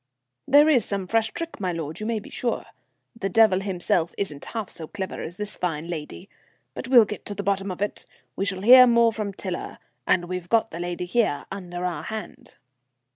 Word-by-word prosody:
"There 290 +3 +7
is 265 -8 +4
some 195 -2 -3
fresh 225 +3 +1
trick, 335 +4 -6
my 185 -3 -1
lord, 160 -2 -5
you 215 - -4
may 230 -1 0
be 210 - -9
sure. 240 - -2 0.5
The 195 -4 -3
devil 215 -2 +5
himself 180 -3 -1
isn't 150 -8 -4
half 220 -4 -5
so 160 - -8
clever 190 0 -5
as 175 +3 -7
this 210 0 -3
fine 165 -2 -3
lady. 150 - -6 0.5
But - - -6
we'll 245 -4 +7
get 210 +1 -7
at 205 - -6
the 200 - -3
bottom 195 0 0
of 185 +2 -3
it. 205 - -5 0.3
We - - -1
shall 190 -2 -2
hear 255 +3 +9
more 235 -1 +4
from 215 -2 -3
Tiler, 185 -2 -5 0.3
and 175 -1 +3
we've 180 -1 -5
got 225 -1 +2
the 170 - -6
lady 175 0 -3
here, 180 -6 0
under 180 -2 -5
our 170 -5 -2
hand." 220 0 -8
195 Hz, 205 wpm, -25 LUFS, 175-225 Hz, 0.5 s, hear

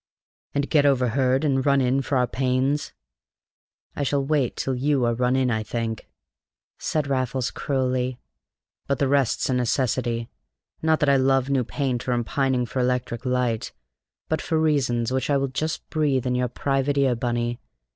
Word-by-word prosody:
"And 140 0 0
get 150 -3 +3
overheard 130 0 +2
and 135 -2 +1
run 140 0 +3
in 130 +1 +2
for 135 +1 -1
our 125 - +3
pains? 130 +4 0 1.0
I - - -3
shall 140 0 0
wait 140 -4 +1
till 135 - -2
you 135 0 +1
are 120 - +2
run 125 +2 +1
in, 130 -2 +2
I 110 -1 0
think," 115 0 -4 0.7
said 155 -2 -1
Raffles 130 -2 -1
cruelly. 130 -2 -1 0.7
"But 140 - +1
the 140 - +1
rest's 140 -3 +1
a 130 - 0
necessity: 120 -1 0 0.5
not 160 0 +2
that 145 - +3
I 140 - +5
love 135 0 +2
new 135 -2 +2
paint 125 0 -2
or 125 - +2
am 120 -1 0
pining 130 0 0
for 125 +2 -4
electric 125 0 -1
light, 125 -3 -1 0.5
but 160 - -1
for 160 -2 0
reasons 130 -7 +1
which 130 +1 -1
I 140 - +3
will 135 0 -1
just 155 +4 -3
breathe 145 -5 +1
in 125 - 0
your 125 0 +1
private 135 +3 -1
ear, 135 -2 +3
Bunny. 120 0 -2
130 Hz, 175 wpm, -24 LUFS, 125-140 Hz, 1.0 s, I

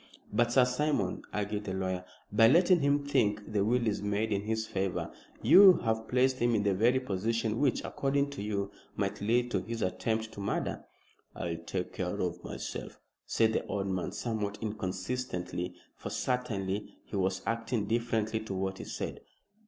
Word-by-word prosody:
"But, 120 +2 +3
Sir 125 0 +6
Simon," 125 -6 0
argued 105 0 -2
the 95 - -3
lawyer, 95 -1 -2 0.3
"by 115 +2 +6
letting 175 +7 +5
him 140 0 +2
think 110 -7 +1
the 100 -2 +3
will 120 +3 +2
is 105 -2 0
made 105 +2 0
in 100 -1 +1
his 110 +1 -1
favor, 95 -3 -2 0.3
you 195 -1 +9
have 110 -1 0
placed 130 +1 +2
him 120 0 +3
in 105 - +2
the 100 -1 +2
very 120 +7 +3
position 115 0 -1
which, 140 -3 +2
according 140 +1 0
to 140 - -6
you, 100 -1 -2 0.2
might 100 0 -2
lead 120 +3 +2
to 95 - +1
his 115 +2 -4
attempt 110 +5 -1
to - - -10
murder." 100 - -2 0.5
"I'll 85 -1 -3
take 90 +2 -4
care 95 +2 -3
of 90 -3 -2
myself," - - -6 0.3
said 110 -1 +3
the - - 0
old 100 -1 -2
man, 95 -2 -2
somewhat 105 -3 -2
inconsistently, 95 -3 -3 0.2
for - - -6
certainly 105 -6 -2
he - - -7
was 95 -1 0
acting 115 0 -1
differently 110 -1 0
to 110 -3 -5
what 95 0 -2
he - - -6
said. - - -5
110 Hz, 175 wpm, -31 LUFS, 100-120 Hz, 0.5 s, you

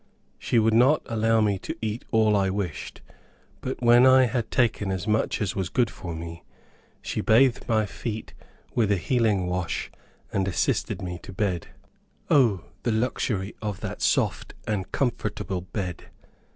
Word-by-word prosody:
She 120 - 0
would 110 0 +4
not 130 +7 +4
allow 115 0 +2
me 100 -2 +1
to - - -5
eat 110 +1 -3
all 110 -2 +3
I 95 -1 +2
wished; 95 -5 -4 0.6
but 130 -1 -4
when 120 +1 +7
I 130 0 +7
had 120 -1 -2
taken 110 -5 +1
as 95 +1 -3
much 110 0 +1
as 100 -4 -2
was 95 -3 -2
good 120 -5 +1
for 85 -3 -7
me, 85 +1 -7 0.6
she - - -2
bathed 120 +2 +3
my 110 -2 +2
feet 110 +2 -6 0.4
with 110 -4 +2
a 100 - +3
healing 105 -1 +1
wash, 90 -1 -2 0.4
and 95 -1 +1
assisted 95 +1 -1
me 90 -1 -5
to - - -10
bed. 95 -3 -2 0.6
O, 115 - +4 0.2
the 120 - 0
luxury 110 -3 -1
of 105 -3 -4
that - - -5
soft - - 0
and 100 -4 -2
comfortable 105 -7 -2
bed! 90 -2 -5
105 Hz, 160 wpm, -26 LUFS, 95-115 Hz, 0.6 s, when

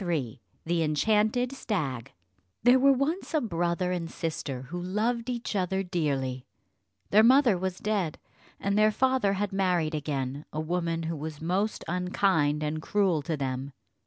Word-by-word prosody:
CHAPTER 175 -2 -2
III 130 -8 -3 0.2
THE 170 0 +1
ENCHANTED 215 - +2
STAG 150 - -3 0.5
There 245 +2 +6
were 275 +1 +6
once 300 +6 -1
a - - +4
brother 175 - -1
and 170 -2 -2
sister 145 -6 -4
who 175 +7 -6
loved 225 +6 -1
each 240 -3 -3
other 190 0 0
dearly; 140 -8 -2 0.6
their 210 - +7
mother 250 -1 +6
was 185 0 -3
dead, 200 -7 -1 0.4
and 200 0 0
their 215 +1 +5
father 255 -3 +2
had 200 0 -2
married 180 -5 +1
again 140 -2 -3
a 155 - -4
woman 165 0 -1
who 165 +1 -2
was 155 0 -6
most 185 +6 -1
unkind 175 -4 +1
and 155 +1 -2
cruel 190 -4 +1
to 160 +1 -3
them. 135 0 -3
180 Hz, 160 wpm, -28 LUFS, 155-210 Hz, 0.6 s, their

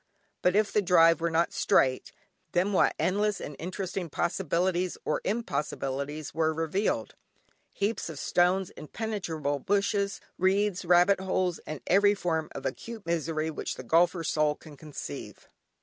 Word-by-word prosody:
But 180 +1 +3
if 215 0 +3
the 210 - +4
drive 165 -3 +5
were 170 - +1
not 165 +1 +1
straight, 130 -1 +2 0.4
then 185 +4 +2
what - - +3
endless 205 +2 +1
and 145 - -7
interesting 185 0 -4
possibilities 180 +2 0
or - - 0
impossibilities 145 - -3
were 160 0 +1
revealed. 165 - -1 0.6
Heaps 205 -2 -2
of 160 - -7
stones, 180 +4 +2
inpenetrable 160 - -3
bushes, 200 0 +1 0.2
reeds, 190 0 +2
rabbit 180 +3 +5
holes, 185 -2 0
and 155 -2 -5
every 200 +2 +4
form 160 -5 -1
of 135 - -6
acute 220 - -5
misery 160 -1 -1
which - - -4
the - - -8
golfer's 165 +5 +2
soul 150 -1 +2
can 155 -1 -14
conceive. 150 +1 -8
175 Hz, 140 wpm, -28 LUFS, 155-195 Hz, 0.6 s, drive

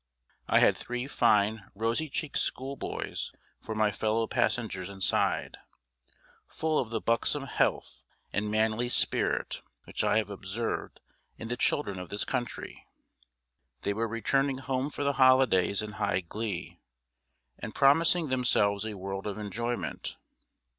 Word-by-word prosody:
I - - +4
had - - +6
three 125 +1 -4
fine 105 -6 +2
rosy 115 +9 0
cheeked 145 +2 -2
schoolboys 135 +1 -3 0.3
for 110 - -4
my 110 -1 +3
fellow 110 +2 0
passengers 110 -6 -1
inside, 95 -1 0 0.9
full 155 -1 0
of 120 - -2
the 115 -1 -1
buxom 115 +6 +1
health 135 - 0 0.3
and 105 +1 0
manly 110 +3 +1
spirit - - +1 0.2
which - - -3
I - - +3
have 105 -2 0
observed 100 +4 -4 0.4
in 115 - -7
the 120 - 0
children 100 -6 0
of 90 - -7
this 100 - -2
country. 120 -1 -4 1.0
They 100 - +1
were 115 +3 -1
returning 135 +4 +1
home 130 +1 -1
for 145 - -4
the 140 0 +2
holidays 125 -6 +5
in 105 - -5
high 105 -2 0
glee, 100 +2 -5 0.8
and - - -6
promising 160 +3 +4
themselves 105 -6 +2
a 110 - -5
world 95 +1 -5
of 100 - -4
enjoyment. 115 +4 -3
115 Hz, 135 wpm, -29 LUFS, 105-130 Hz, 1.0 s, had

